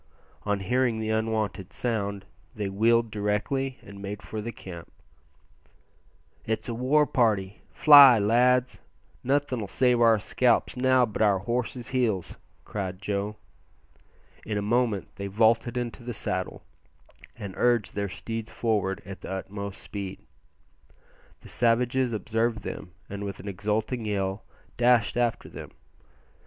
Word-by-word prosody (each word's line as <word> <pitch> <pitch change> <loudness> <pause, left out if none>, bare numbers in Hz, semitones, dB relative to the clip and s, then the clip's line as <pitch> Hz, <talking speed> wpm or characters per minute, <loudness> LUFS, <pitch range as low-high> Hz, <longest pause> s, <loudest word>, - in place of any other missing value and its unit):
On 100 -1 0
hearing 125 +2 +1
the 110 0 -2
unwonted 110 -3 -1
sound 100 -5 -2 0.3
they 105 -3 -3
wheeled 115 +3 +2
directly 110 +6 -1
and 100 -1 -11
made 100 0 -6
for 110 - -5
the 115 +2 -5
camp. 85 -6 -10 1.5
"It's 110 0 -3
a 120 - -3
war 135 +6 +3
party; 105 -8 0
fly, 140 -5 +9
lads! 125 +4 +2 0.4
nothin' 135 -2 0
'll - - -5
save 125 +3 +2
our 115 -1 +6
scalps 120 +3 +1
now 130 0 +4
but 110 -2 -5
our 105 -3 +4
horses' 120 +4 -3
heels," 115 -9 -1 0.3
cried 95 -3 -4
Joe. 100 +1 -2 1.1
In 105 -2 -3
a - - 0
moment 115 -2 0
they 100 - -4
vaulted 115 +4 +2
into 120 0 -4
the 120 -1 -5
saddle 95 -2 -3 0.7
and 100 -4 -7
urged 120 -4 +2
their 100 -1 -2
steeds 115 +3 -5
forward 105 -4 -1
at 95 -2 -9
the - - -8
utmost 100 +1 -5
speed. 100 -2 -7 1.2
The - - -13
savages 120 +2 +2
observed 110 0 -1
them, - - -6 0.2
and 100 0 -6
with 100 -1 -5
an 100 - -9
exulting 105 +4 -2
yell 100 -1 -2 0.3
dashed 120 -1 +3
after 120 -1 0
them. - - -9
110 Hz, 135 wpm, -27 LUFS, 100-120 Hz, 1.5 s, fly